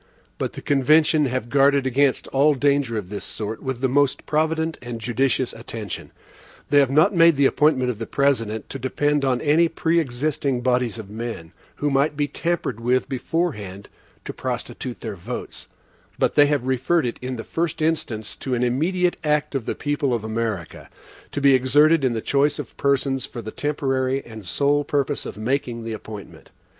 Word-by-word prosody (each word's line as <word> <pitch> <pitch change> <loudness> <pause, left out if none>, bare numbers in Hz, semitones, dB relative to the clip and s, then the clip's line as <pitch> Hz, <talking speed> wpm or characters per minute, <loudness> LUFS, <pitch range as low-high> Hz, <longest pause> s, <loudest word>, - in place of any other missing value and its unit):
But - - -2
the - - -9
convention 150 +2 +4
have 125 -2 -2
guarded 140 +1 +3
against 130 +1 +2
all 145 +2 +3
danger 140 -4 +1
of 95 -4 -5
this 105 0 -5
sort, 110 0 -5
with 130 -2 -4
the 135 - +3
most 140 +1 +1
provident 160 +1 0
and 120 -2 -6
judicious 125 +2 0
attention. 115 -2 -7 0.6
They 145 - +6
have 140 -3 +4
not 155 +9 +4
made 165 -2 +6
the 140 0 +3
appointment 135 -3 +3
of 110 - -9
the 115 - -4
President 115 -6 0
to 135 - -5
depend 145 +3 0
on 130 -2 +1
any 155 +3 +4
preexisting 145 -5 0
bodies 125 -2 +1
of 105 -3 -9
men, 110 -7 -6 0.2
who 145 0 -1
might 140 +2 +1
be 145 -1 +1
tampered 170 -8 -2
with 125 +2 +1
beforehand 120 - -3 0.4
to - - -5
prostitute 125 -2 -5
their 110 -3 -4
votes; 100 +7 -7 0.5
but - - +1
they 145 0 +6
have 145 -3 0
referred 130 +5 +1
it 120 - -3
in 130 0 -4
the 115 - -6
first 165 0 -2
instance 150 -9 -1
to 130 -2 -2
an 120 - 0
immediate 175 +9 +1
act 150 -1 +1
of 135 -5 -3
the - - -1
people 145 -3 0
of 115 - -4
America, 110 -5 -4 0.4
to - - -3
be 140 -1 +5
exerted 145 +4 +4
in 130 -2 +2
the 110 - -2
choice 145 +3 +2
of 145 -6 -7
persons 135 -1 0
for 120 - -8
the 110 - -6
temporary 135 -2 -1
and 110 -5 -10
sole 145 +9 +2
purpose 145 0 -1
of - - -8
making 120 0 -2
the 115 0 -4
appointment. 105 -1 -10
135 Hz, 180 wpm, -23 LUFS, 120-145 Hz, 0.6 s, They